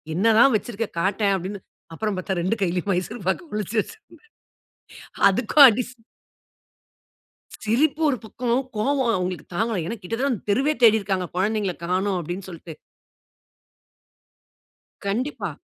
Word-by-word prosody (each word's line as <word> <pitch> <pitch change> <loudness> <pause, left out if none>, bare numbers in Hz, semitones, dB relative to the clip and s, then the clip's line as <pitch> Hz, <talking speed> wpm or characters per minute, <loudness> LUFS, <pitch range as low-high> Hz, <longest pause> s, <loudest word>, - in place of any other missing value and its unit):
"என்னதான் 225 +6 +5
வச்சிருக்க? 225 0 -5
காட்டேன்" 200 +2 +1
அப்படினு, 190 +2 -6 0.3
அப்புறம் 210 0 -2
பாத்தா 190 +1 -3
2 190 +6 0
கையிலும் 180 +2 -1
மைசூர் 185 +3 -4
பாக்கை 345 - -2
ஒளிச்சு 210 +1 -3
வச்சிருந்தேன். 450 -1 -14 1.1
அதுக்கும் 245 +8 +6
அடி 240 +2 -1
சி 250 - -19 1.7
சிரிப்பு 275 +8 +1
ஒரு 255 - 0
பக்கம், 235 +2 -4 0.3
கோவம் 260 +1 +1
அவங்களுக்கு 180 -4 -3
தாங்கல, 220 -1 0
ஏனா 230 - -3
கிட்டத்தட்ட 230 +9 -2
அந்த 230 - -4
தெருவே 270 +9 +2
தேடி 220 -1 +7
இருக்காங்க, 190 -2 -2
குழந்தைகளை 200 -1 0
காணோம் 185 +2 0
அப்படினு 175 +3 -6
சொல்ட்டு. 165 -1 -9 2.3
கண்டிப்பா. 240 +9 -2
210 Hz, 125 wpm, -23 LUFS, 185-235 Hz, 2.3 s, தேடி